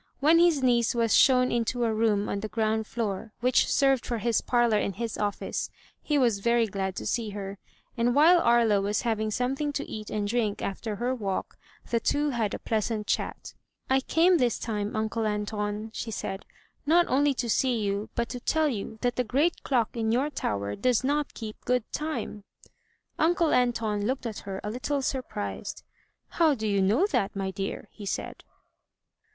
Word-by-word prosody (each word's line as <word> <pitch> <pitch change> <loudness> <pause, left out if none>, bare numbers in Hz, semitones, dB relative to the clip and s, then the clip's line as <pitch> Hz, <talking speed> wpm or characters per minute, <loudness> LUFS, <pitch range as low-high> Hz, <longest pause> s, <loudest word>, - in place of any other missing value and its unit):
When 315 +4 +5
his 335 -6 +4
niece 240 -2 +3
was 230 -2 +3
shown 250 -1 +5
into 240 +1 0
a 225 -1 +1
room 215 -2 +1
on 200 - -2
the 215 - -4
ground 220 0 -1
floor, 220 -1 -3
which 250 +2 +3
served 270 -3 +3
for 240 - -2
his 225 +1 +1
parlor 240 -3 +2
and 195 - -2
his 230 +1 -3
office, 205 -1 -2 0.3
he 295 - 0
was 235 -7 +2
very 235 +2 +3
glad 190 -2 -3
to - - -5
see 230 -3 -1
her; 195 0 -6 0.4
and 240 +2 +1
while 335 +5 +7
Aria 230 -5 +4
was 205 +1 -1
having 220 -2 0
some 250 +4 -1
thing 295 +1 -2
to 285 - -3
eat 215 -1 -7
and 205 -1 -2
drink 215 -2 0
after 210 +2 -4
her 245 +4 -1
walk, 200 -6 -3 0.4
the 235 - +3
two 290 +5 +1
had 225 -5 -1
a - - -4
pleasant 215 -1 -2
chat. - - -3 0.4
"I 265 - +5
came 340 +6 +3
this 245 -2 +2
time. 210 -3 -3
Uncle 220 +1 -1
Anton," 210 +1 -3
she 230 - -4
said, 195 -2 -5 0.4
"not 340 +3 +4
only 280 +1 +2
to 245 - -2
see 245 +2 +2
you, 200 0 -2
but 235 0 0
to 250 - -5
tell 315 +5 +1
you 220 -2 -5
that 245 -1 0
the 250 - +2
great 285 +9 +1
clock 240 -5 0
in 225 -1 0
your 265 +6 +1
tower 100 - -2
does 250 +2 +1
not 290 +2 0
keep 215 -2 -8
good 250 -2 +1
time." 300 -9 -4 0.8
Uncle 335 0 +3
Anton 225 -4 +1
looked 260 0 -2
at 220 -3 -4
her 190 0 -4
a 210 - -3
little 270 +4 -2
surprised. 250 -6 -4 0.5
"How 320 -4 +3
do 220 -3 -3
you 200 -1 +2
know 215 - +3
that, 195 - 0
my 195 -1 -2
dear?" 195 +1 -5
he 205 -2 -9
said. - - -4
230 Hz, 190 wpm, -27 LUFS, 210-255 Hz, 0.8 s, while